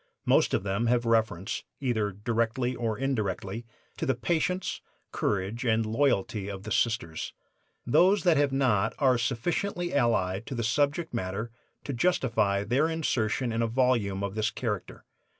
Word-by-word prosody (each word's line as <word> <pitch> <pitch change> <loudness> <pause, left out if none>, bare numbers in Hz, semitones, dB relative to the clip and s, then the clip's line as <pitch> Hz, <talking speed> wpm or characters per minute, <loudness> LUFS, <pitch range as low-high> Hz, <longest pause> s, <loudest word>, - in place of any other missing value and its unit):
Most - - +4
of - - -1
them 100 +4 0
have 120 0 +2
reference, 110 -4 0 0.2
either 110 -6 0
directly 115 +4 -1
or 115 -3 -2
indirectly, 115 -4 -2 0.3
to - - -2
the - - +2
patience, 175 +2 -1 0.3
courage 100 +5 -1
and 115 -2 +2
loyalty 110 -4 0
of 95 -1 -6
the 110 - -7
Sisters. 110 -9 -1 0.5
Those 185 - +4
that 175 -3 +5
have 145 -1 +2
not 120 -6 +2
are 130 -4 +3
sufficiently 175 +9 -1
allied 115 -6 +1
to 135 - -4
the 115 - -2
subject 145 +8 0
matter 105 +1 -3 0.3
to 140 - -4
justify 120 - +1
their 135 +9 +2
insertion 130 -7 0
in 115 +1 -1
a 115 - +2
volume 115 -5 +1
of 100 -1 -2
this 110 0 0
character. 105 -4 -4
115 Hz, 150 wpm, -28 LUFS, 105-135 Hz, 0.5 s, that